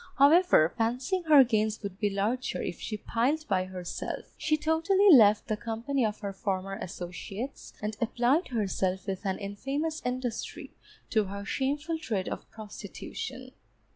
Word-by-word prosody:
However, 285 - +6
fancying 255 +11 0
her 300 -4 +8
gains 220 -3 0
would 200 -1 -6
be 210 - +2
larger 210 +6 -1
if 175 - -4
she 215 - -4
plied 260 +9 0
by 185 -3 +1
herself, 185 -2 -6
she 310 0 +1
totally 330 +6 +4
left 215 -7 +7
the 215 - 0
company 230 +5 -2
of 215 -1 -1
her 200 -2 -4
former 195 -1 -2
associates, 185 +7 -6
and 210 0 -2
applied 245 +8 +2
herself 190 -5 -1
with 190 0 -4
an 190 - 0
infamous 275 +11 -3
industry 250 -2 -4 0.4
to 215 -2 +3
her 200 +1 -6
shameful 290 +7 -1
trade 215 -11 -2
of - - -6
prostitution. 225 +4 -7
225 Hz, 145 wpm, -29 LUFS, 200-280 Hz, 0.4 s, her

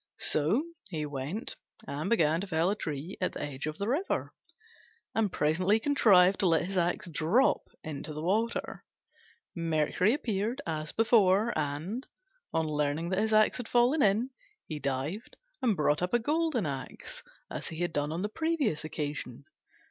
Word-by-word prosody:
So 160 - +2 0.3
he 155 -5 -3
went 145 - -4 0.3
and 150 +7 -3
began 165 -7 +3
to 200 - -4
fell 170 +1 +2
a - - 0
tree 155 0 -5
at 185 - 0
the - - -5
edge 145 0 -4
of 155 0 -4
the 200 - -2
river, 295 - -1 0.8
and 215 -4 +1
presently 180 +9 +2
contrived 200 -8 +5
to 190 - +3
let 165 -1 +3
his 195 +2 -4
axe 175 0 0
drop 175 - +2 0.2
into 155 0 -6
the 155 +1 -5
water. 220 +6 -1 0.7
Mercury 165 - +2
appeared 225 -1 -2
as 155 -1 -3
before, 220 -1 +4
and, 155 - -3 0.4
on 160 -1 +1
learning 150 +2 -1
that 185 +1 +1
his 220 +1 +1
axe 215 0 +4
had 245 -3 -5
fallen 245 +6 +3
in, 220 +5 +3 0.3
he 155 -2 -5
dived 140 - -3 0.2
and 225 -6 +2
brought 150 +1 +2
up 180 +6 +1
a - - +7
golden 300 - 0
axe, 135 -3 -5 0.3
as - - -5
he 160 - -6
had 175 -2 -1
done 145 +1 0
on 170 +4 -2
the - - +1
previous 310 - 0
occasion. 145 -4 -5
180 Hz, 165 wpm, -30 LUFS, 155-220 Hz, 0.8 s, a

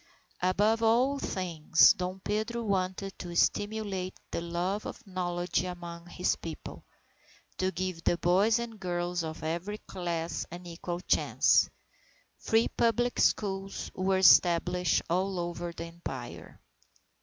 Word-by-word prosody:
Above 205 +5 +2
all 250 +5 +3
things, 165 - +4
Dom 180 +1 -4
Pedro 220 +4 -2
wanted 195 -1 -1
to 175 -2 -6
stimulate 205 -1 0 0.2
the - - -2
love 175 +4 -2
of - - -9
knowledge 175 -2 -1
among 175 -1 -7
his 180 +1 0
People, 165 -2 -8 0.8
to 185 0 +1
give 185 -1 -4
the 175 - +2
boys 195 +7 +3
and 235 -2 -5
girls 175 -1 -2
of 160 0 -6
every 170 +6 -3
class 170 -4 -3
an 175 +2 -9
equal 175 +1 -5
chance. - - +3 0.7
Free 225 +1 +2
public 240 +1 +1
schools 195 -1 0
were 190 +1 +1
established 180 -2 +5
all 185 +2 0
over 175 0 -3
the 165 0 -7
Empire. 150 -8 -8
180 Hz, 125 wpm, -30 LUFS, 175-200 Hz, 0.8 s, established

